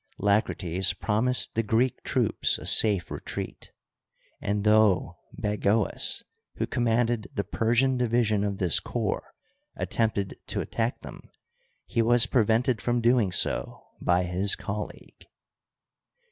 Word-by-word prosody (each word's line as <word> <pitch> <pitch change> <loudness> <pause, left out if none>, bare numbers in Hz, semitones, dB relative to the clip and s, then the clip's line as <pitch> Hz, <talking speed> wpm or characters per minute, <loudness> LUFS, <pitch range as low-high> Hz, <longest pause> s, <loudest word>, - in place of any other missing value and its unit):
La 100 +1 +3
crates 90 -1 -1
promised 120 +4 +1
the 115 - +1
Greek 115 +3 0
troops - - +1
a - - -10
safe 100 -5 +3
retreat; - - -6 0.7
and 100 0 -1
though 105 -3 +3 0.2
Bagoas, 105 0 0 0.3
who - - -1
commanded 115 -1 0
the 100 - 0
Persian 120 +5 +1
division 115 -4 +1
of 100 -1 -2
this 90 -4 +2
corps, - - -3 0.4
attempted 105 -4 -1
to - - -3
attack 115 +1 -2
them, - - -11 0.6
he 115 - 0
was 120 +1 +4
prevented 115 -1 +1
from 120 0 0
doing 115 -4 +3
so - - -2 0.2
by 90 +1 +2
his 90 +3 +2
colleague. 105 +1 -7
110 Hz, 120 wpm, -26 LUFS, 100-120 Hz, 0.7 s, was